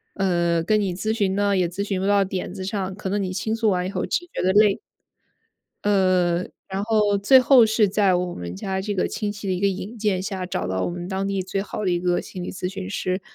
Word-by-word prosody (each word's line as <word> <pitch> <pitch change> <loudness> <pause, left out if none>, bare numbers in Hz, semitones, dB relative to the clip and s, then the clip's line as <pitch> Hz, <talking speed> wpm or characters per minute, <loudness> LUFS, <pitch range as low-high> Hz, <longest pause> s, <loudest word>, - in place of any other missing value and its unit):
呃， 175 -3 +1
跟 215 +4 +2
你 190 -3 -1
咨 215 +4 -1
询 200 -4 0
呢 200 0 +2
也 180 -2 +2
咨 185 +4 -4
询 195 -2 -2
不 195 - 0
到 200 -1 +4
点 185 -1 -4
子 190 -1 -6
上， 190 -1 -3
可 195 -1 -5
能 205 +1 0
你 185 -2 -2
倾 220 +4 -2
诉 225 -1 +1
完 180 -2 0
以 - - -3
后 200 - -2
只 350 - -1
觉 - - -2
得 185 - +2
累。 210 0 +4 1.1
呃， 185 -4 +3 0.3
然 195 +1 -2
后 210 -2 +2
最 210 +7 +6
后 255 -2 +6
是 220 -2 +2
在 200 -1 +3
我 180 0 -1
们 90 0 -6
家 190 - -3
这 205 +1 -3
个 185 - +1
亲 210 -1 -3
戚 205 -1 -7
的 190 - +1
一 180 - -2
个 200 - +2
引 195 +4 -4
荐 205 -4 0
下， 190 -2 -4
找 180 - -3
到 95 0 -2
我 - - -1
们 175 0 -6
当 195 0 -2
地 195 -1 -1
最 195 +1 -2
好 210 +1 -5
的 185 - +1
一 175 - +1
个 175 0 +1
心 185 - -8
理 175 - -5
咨 180 -1 -3
询 190 0 -6
师， 185 -2 -2
195 Hz, 280 characters per minute, -23 LUFS, 185-205 Hz, 1.1 s, 最